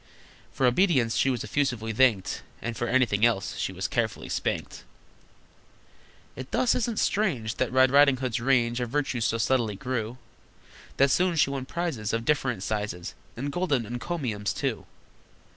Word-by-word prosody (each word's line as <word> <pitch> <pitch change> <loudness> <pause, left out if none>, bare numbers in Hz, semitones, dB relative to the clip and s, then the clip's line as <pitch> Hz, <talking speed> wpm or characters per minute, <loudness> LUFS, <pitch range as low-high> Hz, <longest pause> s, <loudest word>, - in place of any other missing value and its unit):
For 130 - 0
obedience 125 - +3
she 135 - +2
was 125 -4 -1
effusively 115 -2 -1
thanked, 115 -5 +2 0.2
And 115 0 -4
for 120 - -2
anything 120 -5 +2
else 115 -5 +2
she - - -1
was - - -3
carefully - - -2
spanked. - - -3 1.5
It 130 0 -8
thus 250 - +2
isn't 235 -2 -1
strange 155 - 0
That 130 - 0
Red 130 0 +4
Riding 140 -1 +6
Hood's 125 -2 -2
range 120 -1 +2
Of 125 -1 -2
virtues 130 -4 -1
so 115 - +1
steadily 115 -2 +1
grew, 120 +2 -3 0.8
That 140 0 +4
soon 180 +2 +2
she 150 -3 +3
won 135 -2 -4
prizes 140 -13 -3
Of 115 0 -1
different 125 -9 0
sizes, 100 -4 -3 0.2
And 140 +4 -3
golden 145 -8 0
encomiums, 120 - -3
too! - - -3
125 Hz, 155 wpm, -27 LUFS, 115-140 Hz, 1.5 s, Riding